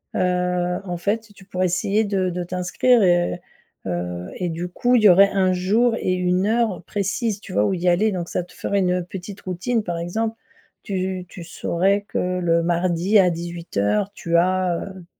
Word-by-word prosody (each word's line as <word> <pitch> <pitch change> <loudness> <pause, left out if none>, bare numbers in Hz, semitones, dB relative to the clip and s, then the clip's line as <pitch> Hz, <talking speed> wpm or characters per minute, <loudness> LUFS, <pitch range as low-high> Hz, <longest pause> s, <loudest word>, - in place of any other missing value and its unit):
heu, 180 -1 0
en 180 -2 -4
fait, 215 +5 -2
tu 195 - -16
pourrais 185 -1 -1
essayer 195 +5 +1
de 195 -3 0
de 180 0 -3
t'inscrire 180 +7 +2
et 175 0 +2 0.5
heu 90 -1 -3
et 180 -2 -2
du 170 +2 -4
coup, 245 +7 +1
il 225 - +3
y 205 - +9
aurait 195 +3 +7
un 185 -1 +2
jour 220 +6 +2
et 185 - 0
une 180 +2 +1
heure 220 -5 0
précise, 205 +2 -2
tu - - -10
vois, 105 +1 +3
où - - +1
y 180 0 -2
aller 200 +5 +3
donc 175 -2 -4
ça 180 - -2
te 180 - -17
ferait 200 - -1
une 180 -2 0
petite 190 +2 -8
routine, 205 +5 -2
par 170 -3 -3
exemple. 220 +6 -2 0.5
Tu 185 -3 -3
tu 175 - -9
saurais 190 +4 0
que 180 0 -1
le 170 -1 +2
mardi 175 +4 +2
à 185 -2 +5
18:00 170 - -2
tu 170 -4 0
as, 180 0 +1
heu, 190 -3 -9
180 Hz, 190 wpm, -22 LUFS, 175-200 Hz, 0.5 s, y